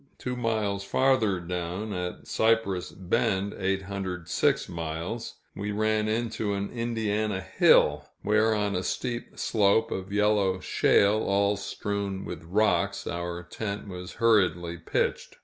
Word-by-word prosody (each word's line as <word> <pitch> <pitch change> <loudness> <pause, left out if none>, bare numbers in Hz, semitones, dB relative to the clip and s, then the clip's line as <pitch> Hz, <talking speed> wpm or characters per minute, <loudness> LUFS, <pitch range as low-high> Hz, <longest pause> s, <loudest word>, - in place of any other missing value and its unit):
Two 125 0 -4
miles 110 -5 -1
farther 110 -3 +2
down, 90 +4 -4
at 90 -1 -4
Cypress 110 -5 +1
Bend 95 +2 0
(806 95 -2 -1
miles), 85 +7 -5 0.2
we 100 +1 -3
ran 110 +1 +1
into 110 -2 -1
an 100 0 -3
Indiana 110 -4 -1
hill, - - +4
where 110 +1 +3
on 105 -2 0
a 90 - 0
steep 120 +4 -4
slope 110 +1 +2
of 95 +1 -4
yellow 105 -2 +2
shale, 100 +3 +3
all 100 +1 +2
strewn 100 -1 -3
with 85 -2 -6
rocks, 105 +6 +1
our 85 0 -4
tent 100 +3 -5
was 90 -1 -7
hurriedly 90 -7 +2
pitched. 85 - -1
100 Hz, 125 wpm, -27 LUFS, 90-110 Hz, 0.2 s, hill